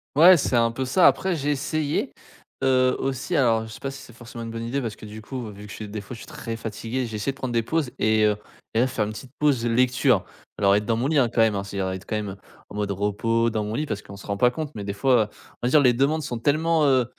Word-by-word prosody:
Ouais, 175 +5 +9
c'est 140 -6 +1
un 115 0 +3
peu 130 +3 -3
ça. 150 +8 +5
Après, 185 -3 +2
j'ai 145 +1 0
essayé, 145 +1 -1 0.5
heu, 130 -1 +3
aussi. 135 +5 -3
Alors, 115 -4 +3
je 110 - -10
sais - - -10
pas 135 - -4
si 135 0 -10
c'est 130 - -13
forcement 115 0 -9
une 115 - -6
bonne 115 0 -5
idée 135 +4 -1
parce 115 -4 -5
que, - - -11
du 105 +1 -9
coup, 120 0 -6
vu 105 +1 -11
que - - -11
je 110 - -7
s - - -10
des 105 0 -5
fois 100 - -9
je - - -12
suis - - -11
très 135 -7 -6
fatigué, 115 +3 -4
j'ai 110 -2 -6
essayé 105 +6 -1
de 135 - -15
prendre 130 -3 -4
des 115 -1 +2
pauses 150 +1 -1
et 110 0 +3
heu, 105 0 +3 0.4
et 110 - +2
là, 130 - +3
faire 115 -4 -1
une 105 - -5
petite 120 +4 -10
pause 140 -6 +2
lecture. 120 +1 +3 0.3
Alors, 100 -1 +5
être 105 +1 0
dans 115 +1 +1
mon 125 +4 0
lit, 155 +1 +1
hein, 125 -4 +4
quand - - -1
même, 110 -2 +4
c'est 100 0 -6
à 95 -1 0
dire 95 - -14
quand 110 - -2
même 100 -3 -4 0.3
en - - -10
mode 105 -1 -1
repos, 105 +4 +1
dans 110 -1 -2
mon 105 +1 -4
lit, 150 +7 -1
parce 105 -8 -4
qu'on 100 - -11
se 100 - -12
rend 100 - -1
pas 125 +5 +4
compte, 150 +2 -5
mais 105 - -5
des 100 - -3
fois, 120 +3 +3
heu, - - -6 0.4
on - - +2
va - - +2
dire 150 - +6
les 125 -4 +5
demandes 140 +6 +1
sont 120 -4 -4
tellement, 155 +4 +2
heu 130 -3 +4
120 Hz, 300 wpm, -24 LUFS, 110-135 Hz, 0.5 s, Ouais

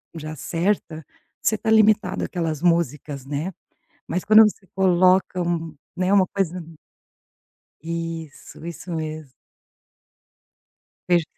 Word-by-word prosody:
já 155 0 -6
certa, 165 -1 -2 0.4
você 220 - +1
tá 220 +1 -1
limitado 215 -3 +3
àquelas 165 -4 -3
músicas, 150 -5 0
né. 150 +7 -3 0.5
Mas 180 +2 -2
quando 215 +1 +8
você 210 -2 -1
coloca 185 0 +3
um 165 -2 -2 0.2
né, 185 +2 +1
uma 195 -2 +5
coisa 180 -2 -2 1.2
Isso, 165 -1 -6
isso 170 +1 -7
mesmo. 155 -3 -5 1.8
Veja 175 -1 +4
170 Hz, 105 wpm, -23 LUFS, 160-190 Hz, 1.8 s, quando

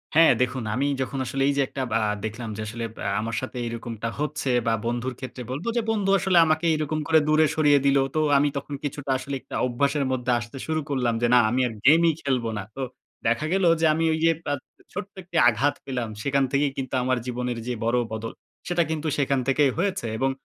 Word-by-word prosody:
হ্যাঁ, 165 0 +7
দেখুন, 125 -1 0
আমি 140 +3 +1
যখন 135 +1 -3
আসলে 135 +3 -1
এই - - +2
যে - - +4
একটা 135 - -5
ব্যা 115 - +2 0.2
দেখলাম 115 +1 -5
যে - - -4
আসলে 115 +1 -5 0.2
আ - - +1
আমার 115 0 -3
সাথে 130 -1 -6
এইরকমটা 115 -1 -5
হচ্ছে, 150 -2 -2 0.2
বা 115 - +3
বন্ধুর 120 +2 -2
ক্ষেত্রে 130 -1 -7
বলবো 145 - -4
যে - - +3
বন্ধু 205 -3 0
আসলে 185 -1 +2
আমাকে 160 +2 +1
এরকম 155 0 -2
করে 160 -1 +5
দূরে 155 +1 +5
সরিয়ে 145 -2 +5
দিলো, 140 -1 +4
তো - - +2 0.2
আমি 145 +1 +3
তখন 140 +1 -6
কিছুটা 140 -1 -3
আসলে 140 0 -4
একটা - - -9
অভ্যাসের 140 +3 0
মধ্যে 125 -1 0
আসতে 120 +3 -8
শুরু 155 0 0
করলাম, 125 -4 +1
যে 120 - +3
না, - - +8
আমি 130 +2 +1
আর 115 - -6
গেমই 165 +2 +6
খেলবো 125 -5 0
না। 100 - -3
তো 135 - -5 0.5
দেখা 120 +6 +1
গেলো 190 -2 +3
যে - - +4
আমি 165 - 0
ওই 160 - -1
যে - - +6 0.2
আ - - +2 0.4
ছোট্ট 200 - -5
একটি 170 -1 -4
আঘাত 135 +6 +1
পেলাম, 125 -4 -3
সেখান 140 -1 +2
থেকেই 140 0 +2
কিন্তু 130 -1 -4
আমার 130 0 +1
জীবনের 125 -1 -3
যে 125 - -1
বড় 120 +2 +2
বদল, 110 +1 -4 0.3
সেটা 175 -1 +2
কিন্তু 155 0 -2
সেখান 140 -2 +1
থেকেই 135 0 +3
হয়েছে। 195 -7 -1
এবং 135 +3 +1
135 Hz, 215 wpm, -25 LUFS, 120-155 Hz, 0.5 s, না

